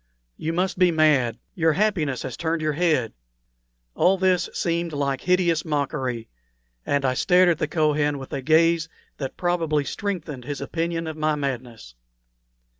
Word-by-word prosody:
You 160 - -3
must 180 +2 -1
be 180 -1 +5
mad; 150 -7 +3 0.2
your 165 -2 +2
happiness 175 -9 0
has 130 - -5
turned 165 0 -1
your 155 -1 0
head." 155 -7 +1 0.8
All 190 - +3
this 185 -1 +2
seemed 170 -1 -1
like 140 -2 -1
hideous 175 -3 +2
mockery, 135 -6 -2 0.6
and 140 -1 +1
I 130 - +2
stared 180 +6 +4
at 165 -2 +1
the 155 - 0
Kohen 150 -2 +1
with 135 -1 -9
a 140 - -2
gaze 165 +3 +3 0.3
that 135 -2 -5
probably 165 -4 0
strengthened 160 - -4
his 145 0 -4
opinion 165 0 -2
of 160 -1 -5
my 155 0 +1
madness. 125 - -5
155 Hz, 155 wpm, -24 LUFS, 140-170 Hz, 0.8 s, be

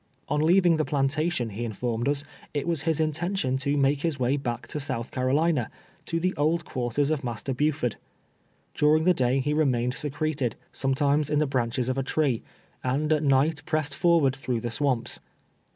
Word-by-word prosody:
On 150 +1 +1
leaving 175 +1 +4
the 155 - +2
plantation, 145 -3 0
he 110 +4 -4
informed 115 +2 -2
us, 145 0 0 0.3
it 145 - -1
was 165 -4 0
his 160 - +1
intention 160 -2 0
to 140 +2 0
make 140 0 +2
his 160 -4 -1
way 130 +2 +2
back 120 -4 -3
to 150 - -3
South 120 -4 -3
Carolina 135 +1 +1 0.2
— - - -32
to 165 - -1
the 185 +2 0
old 160 +3 +1
cpiarters 130 +3 -1
of 155 -2 -1
Mas 120 -3 -4
ter 135 - -2
Buford. 145 -3 0 0.8
During 155 +1 +3
the 180 +2 +5
dav 130 -2 +1
he 150 +2 0
remained 125 -5 +1
secreted, 145 -2 -2 0.2
sometimes 140 +2 +1
in 150 - +1
the 155 - +3
branches 125 -2 -1
of 130 +1 0
a - - 0
tree, 135 -4 0 0.4
and 145 +5 +1
at 155 - +1
night 145 +2 +2
pressed 155 -2 0
forward 165 -4 +3
tln 130 -2 -3
ough - - -4
the 120 - -2
swamps. 130 -1 0
140 Hz, 190 wpm, -26 LUFS, 130-155 Hz, 0.8 s, the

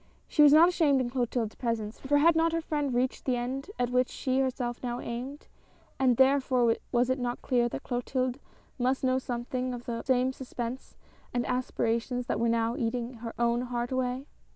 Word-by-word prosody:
She 300 - +2
was 295 -1 +8
not 315 +3 +8
ashamed 310 -6 +3
in 245 -2 -1
Clo 250 -1 +1
tilde's 225 -3 -2
presence, 230 -3 -3
for 290 +2 +2
had 325 +3 +5
not 325 0 +2
her 330 - +1
friend 295 -3 -1
reached 250 +2 0
the 255 - +1
end 260 +6 -3
at 245 0 0
which 250 0 +2
she 260 -1 -1
herself 250 -2 -1
now 245 -1 -3
aimed, 255 +5 -6 0.5
and 255 -3 +3
therefore 260 -3 +4 0.2
was 245 +1 +2
it 260 - 0
not 245 -1 -3
clear 240 -2 +2
that - - -6
Clotilde 255 +1 -2 0.4
must 255 +2 +1
know 260 0 +2
something 250 0 -3
of 240 - -9
the 230 -1 -3
same 260 0 +1
suspense 250 -1 -6 0.4
and 240 - +1
aspirations 250 0 -1
that - - -1
were 235 0 +2
now 230 0 +1
eating 240 -1 -2
her 230 -1 -6
own 235 0 +2
heart 245 0 -3
away. 260 +1 -1
250 Hz, 195 wpm, -29 LUFS, 240-265 Hz, 0.5 s, was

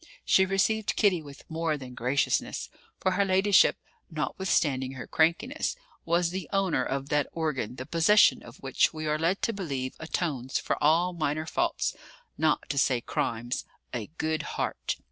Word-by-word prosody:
She 190 0 +4
received 205 +3 +1
Kitty 190 -6 +3
with 145 -2 -12
more 160 -1 -1
than 130 -3 -9
graciousness; 125 +4 0 0.3
for 185 - +1
her 190 +2 +2
ladyship, 195 +1 +4 0.3
notwithstanding 150 -5 0
her 130 - -7
crankiness, 170 - +1 0.3
was 170 +1 +2
the 185 -3 -5
owner 195 -3 +1
of 135 +1 -3
that 150 -1 +2
organ 135 -8 -2
the 130 - -6
possession 170 +8 +5
of - - -13
which - - +2
we 155 0 -4
are 150 0 0
led 170 +5 0
to 230 - +1
believe 140 -10 -3
atones 150 -5 -2
for - - -1
all 170 +4 +4
minor 155 -1 -1
faults, 345 - -1 0.4
not 155 -1 +1
to 140 - 0
say 130 -2 +3
crimes 120 +1 -2 0.3
a 115 -4 -3
"good 160 0 0 0.2
heart." - - -2
160 Hz, 160 wpm, -28 LUFS, 140-185 Hz, 0.4 s, possession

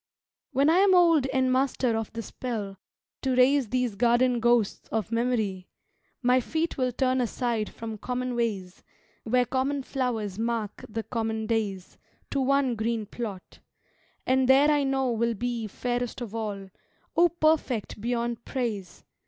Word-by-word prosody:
When 275 +1 +3
I 330 +3 +5
am 390 -1 +5
old 330 -6 +5
and 260 -1 +1
master 255 -2 +1
of 225 -1 -3
the 230 0 -4
spell 210 -4 -5 0.4
To 260 -2 0
raise 255 -1 +4
these 250 -2 0
garden 240 +3 +3
ghosts 235 -3 +1
of 220 -1 -2
memory, 225 -6 -1 0.6
My 250 +1 +4
feet 320 +6 -2
will 255 -1 0
turn 255 +1 +1
aside 235 -2 -1
from 225 -2 -7
common 250 +1 -3
ways, 200 -6 -3 0.4
Where 250 +2 +3
common 270 +2 -1
flowers 230 -8 -2
mark 230 -3 -2
the 225 +1 -3
common 220 -2 -2
days, 210 -5 -2 0.3
To 275 - 0
one 270 -1 +2
green 225 0 -1
plot; 205 -3 -7 0.7
and 260 0 +2
there 280 +3 +6
I 295 -1 +3
know 270 -2 +1
will 235 0 0
be 235 0 -3
Fairest 245 +4 -3
of 235 -4 -6
all 205 -4 -4 0.4
(O 345 +1 +5
perfect 310 - 0
beyond 235 0 -2
praise!) 220 -8 -4
240 Hz, 150 wpm, -27 LUFS, 220-260 Hz, 0.7 s, there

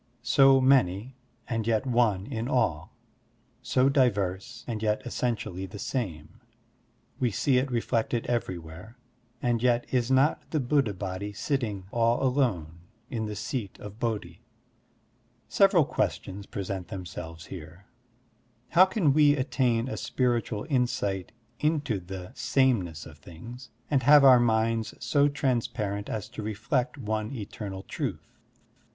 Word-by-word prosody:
So 135 -1 +6
many, 130 -3 +2 0.3
and 115 -2 -2
yet 110 +1 +1
one 115 -6 +2
in 115 -2 -4
all; 85 - 0 0.7
so 130 +1 +2
diverse, 120 -3 0
and 110 -3 -4
yet 105 -1 0
essentially 110 -7 -3
the 95 - -9
same; 90 - -4 0.8
we 125 -3 +2
see 125 +4 +2
it 135 +2 -2
reflected 115 -1 0
ever3rwhere, 95 -2 -4 0.5
and 120 -2 +1
yet 120 -1 +2
is 125 -1 +1
not 135 +3 +3
the 155 - 0
Buddha 130 -5 +1
Body 95 +2 -5
sitting, 105 -4 -2
all 115 +2 +2
alone, 110 - 0 0.3
in 110 -3 -2
the 105 - -5
Seat 110 0 -4
of 105 +1 -10
Bodhi? 105 -6 -3 1.1
Several 195 -6 +4
questions 100 -4 -3
present 95 -2 -5
themselves 85 -4 -7
here: 90 +2 -10 0.8
How 180 +3 +7
can 185 -7 +2
we 145 -1 +5
attain 125 -3 0
a - - -4
spiritual 120 -4 -1
insight 110 - -1 0.3
into 150 -8 0
the 90 +1 -8
sameness 120 - +1
of - - -13
things, 120 +9 -11 0.2
and 140 -3 +3
have 145 +2 +7
our 130 -2 +8
minds 115 -1 +1
so 140 +4 +3
trans 130 -5 0
parent 100 -3 -4
as 105 -2 -4
to - - -7
reflect 120 +5 -1
one 110 -3 -3
eternal 100 -5 -6
truth? - - -5
115 Hz, 135 wpm, -27 LUFS, 100-130 Hz, 1.1 s, our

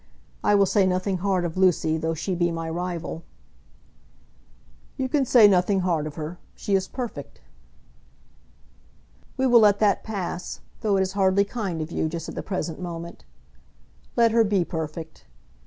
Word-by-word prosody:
I 205 - +4
will 200 -1 +5
say 195 0 +2
nothing 185 +1 0
hard 185 -2 0
of 170 +1 -4
Lucy, 180 -4 +3
though 160 +1 -2
she 185 +4 -3
be 175 -1 +1
my 165 -1 -4
rival." 175 -1 -4 1.8
"You 265 -2 -1
can 275 +1 +1
say 230 -4 +7
nothing 190 0 +3
hard 165 -4 0
of 150 - -8
her. 160 +2 -6 0.2
She 200 - -3
is 190 -1 +2
perfect." 235 - -7 2.0
"We 265 - +1
will 245 -2 +6
let 205 -2 +5
that 205 -2 +2
pass, 185 -4 -5 0.2
though 205 -3 +1
it - - +2
is 190 - -3
hardly 195 0 +3
kind 195 -7 -3
of 155 - -9
you, 160 - -1
just 165 0 -5
at - - -6
the - - -4
present 180 -4 -4
moment. 170 -1 -7 0.9
Let 235 -1 +4
her 230 0 +4
be 200 -4 +1
perfect. 160 - -6
185 Hz, 165 wpm, -24 LUFS, 165-205 Hz, 2.0 s, say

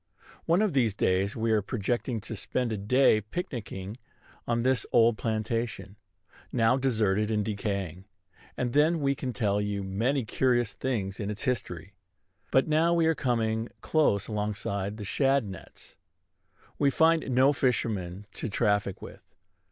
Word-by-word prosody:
One 175 +6 +4
of 210 - 0
these 120 -7 +2
days 95 +1 +1
we 115 0 0
are 110 -1 +3
projecting 120 +2 -2
to 110 - -7
spend 115 +4 -2
a 110 - -2
day 110 +1 +4
picnicking 105 - -6 0.5
on 120 0 0
this 130 0 +2
old 115 -1 +5
plantation, 110 -3 -2 0.6
now 115 0 +3
deserted 110 -6 +1
and 105 -2 0
decaying; 100 -4 -3 0.5
and 125 -1 -1
then 155 +3 +3
we 140 -1 +1
can 130 -2 -4
tell 105 -2 0
you 100 -1 -2
many 115 +7 0
curious 120 -1 +1
things 100 -7 -3
in 105 -1 -3
its 105 0 -4
history. 100 - -3 0.6
But 130 - +3
now 160 +2 +3
we 165 -1 +3
are 160 - +4
coming 115 -5 -1
close 145 -11 +2
alongside 105 -1 -3
the 105 - -6
shad 135 +4 +2
nets. 95 -3 -11 0.8
We 140 - +4
find 160 +1 +3
no 130 +3 +4
fishermen 105 -8 -1
to 115 - -5
traffic 105 -3 0
with. - - -13
115 Hz, 150 wpm, -28 LUFS, 100-130 Hz, 0.8 s, old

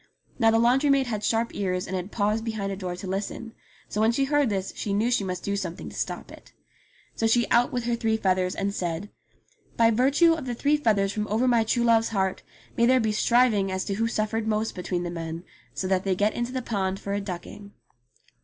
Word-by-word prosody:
Now 225 -2 +5
the 225 - +4
laundry 250 +5 +3
maid 275 -1 +4
had 215 -4 -3
sharp 230 +1 0
ears 185 -2 -2
and 190 - -4
had 185 +2 -4
paused 215 +1 0
behind 215 -4 -3
a - - -3
door 185 -2 -4
to 185 - -8
listen; 200 +4 -4 0.3
so 210 - -2
when 220 +1 +4
she 270 +4 +1
heard 290 -2 +2
this 195 -2 -2
she 200 -2 -2
knew 225 +4 +1
she 225 - +2
must 185 -1 -4
do 200 - -1
something 180 -4 -5
to - - -12
stop - - -4
it. - - -15 0.6
So 225 - 0
she 235 +1 +3
out 240 +1 +4
with 245 -1 -2
her 235 0 0
three 225 -1 0
feathers 185 -3 0
and 200 0 -2
said, 175 +2 -3 0.7
"By 230 0 +5
virtue 280 +8 +4
of 305 -5 -5
the 240 - -2
three 285 +5 +2
feathers 205 -8 +1
from 210 0 -2
over 225 +5 +1
my 235 -2 +4
true 235 +2 0
love's 230 -1 +3
heart 190 -3 -1 0.3
may 235 - +3
there 255 +1 +5
be 220 -2 +1
striving 215 -3 +3
as 190 0 -2
to 200 - -2
who 225 +3 0
suffered 220 0 -1
most 220 0 0
between 180 -1 -3
the 175 - -4
men 165 0 -5 0.3
so 170 +6 -2
that 185 -1 +1
they 195 -2 +1
get 205 +3 +1
into 240 +1 -3
the 255 -1 -3
pond 195 -4 -2
for 200 - -4
a 205 - -1
ducking." 200 +2 -8
215 Hz, 235 wpm, -26 LUFS, 195-235 Hz, 0.7 s, Now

